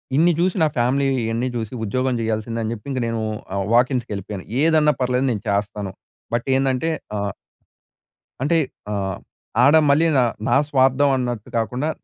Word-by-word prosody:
ఇన్ని 165 +4 +5
జూసి 180 +2 +1
నా - - +5
ఫ్యామిలీ 130 +4 +2 0.2
ఇ‌యన్ని 115 +2 -1
జూసి, 110 -1 -4
ఉద్యోగం 130 +5 0
జెయాల్సిందే 115 +1 -2
అని 110 - -2
జెప్పి 105 +1 -10
ఇంక 130 - -1
నేను 115 -1 -2 0.3
ఆహ్, 100 0 -1
వాకీన్స్‌కి 125 -1 +2
ఎళ్ళిపోయాను. 100 0 -6 0.2
ఏదన్నా 155 -2 +4
పర్లేదు 125 +1 +1
నేను 105 -4 -2
చేస్తాను. 100 -1 -2 0.4
బట్, 120 0 0
ఏందంటే 135 +3 +1 0.3
ఆహ్ 100 -1 -1 1.1
అంటే 150 +5 +2 0.4
ఆహ్, 95 -2 -2 0.4
ఆడ 145 +4 +6
మళ్ళీ 150 +4 +4
నా 130 - +5 0.2
నా - - +3
స్వార్థం 135 +1 +3
అన్నట్టు 120 -4 -3
కాకుండా, 125 +6 -1
125 Hz, 155 wpm, -21 LUFS, 110-135 Hz, 1.1 s, ఆడ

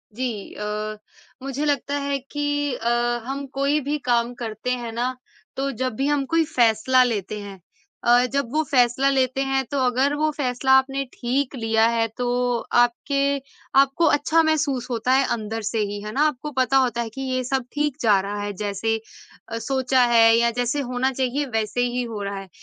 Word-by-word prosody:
जी 235 -5 -4
अ, 210 +1 -4 0.5
मुझे 275 +2 -3
लगता 285 -1 0
है 280 0 -1
कि 290 -1 -1
अ, 235 0 -2 0.4
हम 275 +2 -4
कोई 280 +2 +1
भी 290 +3 -2
काम 235 0 +2
करते 220 +2 -3
हैं 240 -2 -3
ना, 245 +3 -2 0.4
तो 275 +1 -1
जब 255 0 -2
भी 275 +3 0
हम 290 -2 +1
कोई 330 +3 +2
फ़ैसला 240 +2 +4
लेते 210 -3 -2
हैं 200 -2 -9 0.4
अ, 240 +1 +5
जब 280 -3 -1
वो 315 - +2
फ़ैसला 255 +1 +3
लेते 265 -1 +1
हैं, 270 0 +1
तो 280 - 0
अगर 260 +3 +2
वो 310 - +3
फ़ैसला 265 -1 0
आपने 270 +1 0
ठीक 260 +3 -1
लिया 225 -2 +2
है, 230 -1 +1
तो 250 - -1 0.5
आपके 240 +4 +2 0.6
आपको 275 +5 +3
अच्छा 315 +3 +2
महसूस 295 -6 0
होता 235 +1 0
है, 270 +1 +5
अंदर 225 0 -4
से 220 +1 -2
ही। 205 0 -5
है 210 - -5
ना? 275 +7 -1
आपको 300 +1 -4
पता 260 +1 +3
होता 245 -3 +1
है 230 - -4
कि 270 +5 -8
ये 255 -1 -1
सब 260 0 -1
ठीक 295 -2 -1
जा 210 -4 +4
रहा 205 +1 -4
है। 205 0 -3
जैसे 205 +2 -1 0.6
अ, 230 - -2
सोचा 260 0 +1
है, 230 - +6 0.2
या 235 0 +3
जैसे 255 +4 0
होना 255 +2 +1
चाहिए, 265 +2 -1
वैसे 220 +2 0
ही 245 +1 -1
हो 225 -4 -5
रहा 200 0 -4
है। 195 -1 -11
255 Hz, 190 wpm, -23 LUFS, 230-275 Hz, 0.6 s, है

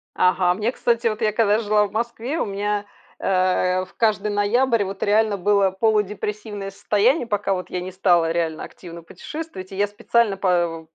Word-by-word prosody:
Ага, 180 -1 +3
мне, 215 +4 -1
кстати, 235 -2 0
вот 215 0 -2
я, 215 -1 +2
когда 215 -1 +2
жила 210 -1 +2
в - - -18
Москве, 235 +6 -3
у - - 0
меня, 205 +1 -2 0.3
э, 185 0 +1
в - - -22
каждый 215 -2 +1
ноябрь 225 +3 +2
вот 195 0 -5
реально 210 0 +2
было 200 +1 +3
полудепрессивное 210 0 -2
состояние. 225 - +1
Пока 205 -2 0
вот 185 -1 -5
я 180 - -3
не 185 +1 -6
стала 175 -3 +2
реально 165 -2 -2
активно 170 -2 -11
путешествовать. 250 - -8
И - - -7
я 205 +1 +1
специально 205 0 +1
па 175 -4 0
205 Hz, 175 wpm, -22 LUFS, 185-220 Hz, 0.3 s, Ага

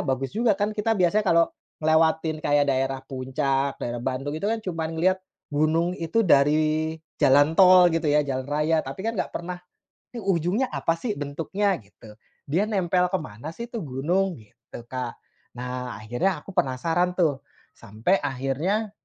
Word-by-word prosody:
bagus 135 - -2
juga 230 -1 +3
kan 205 +2 -2
kita 220 +2 +1
biasa 205 +1 +2
kalau 170 -2 +4 0.3
ngelewatin 160 0 +2
kayak 145 0 +3
daerah 135 0 0
Puncak, 135 +1 -1
daerah 120 0 -3
Bandung, 135 +3 -2
itu 180 - -5
kan 220 +1 0
cuman 165 -5 -3
ngeliat 185 +3 +3 0.3
gunung 160 +4 +1
itu 170 +7 0
dari 155 -1 +3 0.2
jalan 145 +2 +4
tol 185 -1 +8
gitu 165 0 -1
ya, 150 0 +4
jalan 130 -2 -2
raya, 150 +2 +1
tapi 135 +6 -7
kan 225 +3 -2
gak - - -2
pernah 180 +1 -5 0.6
nih 240 - -6
ujungnya 190 +7 +1
apa 165 0 0
sih 215 0 -2
bentuknya 165 +8 -1
gitu. 105 +1 -16 0.3
Dia 175 +9 0
nempel 180 -3 +1
ke 190 - -2
mana 150 +5 -8
sih 235 0 -7
tuh 235 - -4
gunung, 170 +8 0
gitu 110 +2 -13
Kak. 125 -2 -4 0.4
Nah, 125 -1 -5
akhirnya 120 - 0
aku - - -10
penasaran 165 +7 +1
tuh, 155 -7 +1 0.4
sampai 110 - 0
akhirnya 145 - -1
160 Hz, 160 wpm, -25 LUFS, 135-185 Hz, 0.6 s, tol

